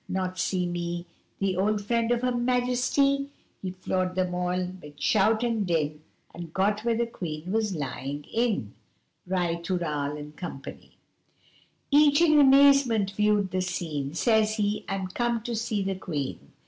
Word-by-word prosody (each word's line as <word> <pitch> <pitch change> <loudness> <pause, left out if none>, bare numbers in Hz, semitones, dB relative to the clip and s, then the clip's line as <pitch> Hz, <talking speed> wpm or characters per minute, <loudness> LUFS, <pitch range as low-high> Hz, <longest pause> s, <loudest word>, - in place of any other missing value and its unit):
Not 185 0 -2
see 185 -2 0
me, 175 0 -3 0.3
The 195 -1 0
old 205 +3 +1
friend 230 +1 +1
of 240 0 +1
Her 250 - +2
Majesty?' 250 +3 +1 0.3
He 190 - -3
floored 185 0 -2
them 185 -1 0
all 180 0 -1 0.2
'mid 145 -1 -13
shout 220 +5 +3
and 230 -3 0
din 155 -3 -1 0.3
And 170 -2 -8
got 205 +4 +1
where 235 -1 +1
the 235 - +1
Queen 175 -6 -6
was 215 -3 0
lying 145 0 -4
in. 225 - 0 0.5
Ri 175 -2 0
tooral, 150 -5 -2 0.6
&c. - - -22 1.0
Each 290 0 +6
in 310 -3 +5
amazement 270 -7 +5
viewed 210 -1 +1
the 185 +1 0
scene 160 -5 -3
Says 220 +1 +3
he 210 -1 -1
'I'm 190 -1 -2
comed 235 +3 -1
to 240 - -2
see 220 -2 -1
the 195 0 -1
Queen! 155 -8 -5
195 Hz, 150 wpm, -27 LUFS, 175-235 Hz, 1.0 s, Each